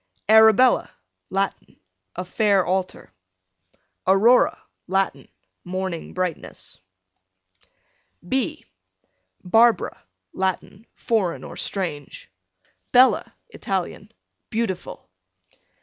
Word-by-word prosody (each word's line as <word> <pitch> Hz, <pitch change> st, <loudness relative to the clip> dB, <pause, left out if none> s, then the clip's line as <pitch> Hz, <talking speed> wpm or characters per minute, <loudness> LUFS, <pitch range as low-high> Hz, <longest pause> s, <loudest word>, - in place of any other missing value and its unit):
Arabella, 220 Hz, +3 st, +5 dB, 0.4 s
Latin, 195 Hz, 0 st, -3 dB, 0.4 s
a 180 Hz, -, -5 dB
fair 200 Hz, 0 st, +2 dB
altar. 185 Hz, 0 st, -3 dB, 0.9 s
Aurora, 215 Hz, +6 st, +4 dB, 0.3 s
Latin, 185 Hz, -7 st, -1 dB, 0.4 s
morning 185 Hz, -2 st, -5 dB
brightness. 180 Hz, -3 st, -5 dB, 1.5 s
B 270 Hz, -, -2 dB, 0.8 s
Barbara, 225 Hz, +2 st, +2 dB, 0.3 s
Latin, 190 Hz, +3 st, -3 dB
foreign 200 Hz, -7 st, -1 dB
or -, -, -9 dB
strange. 155 Hz, -, -5 dB, 0.6 s
Bella, 255 Hz, +1 st, +4 dB, 0.2 s
Italian, -, -, -4 dB, 0.4 s
beautiful. 220 Hz, -6 st, -4 dB
195 Hz, 70 wpm, -23 LUFS, 180-225 Hz, 1.5 s, Arabella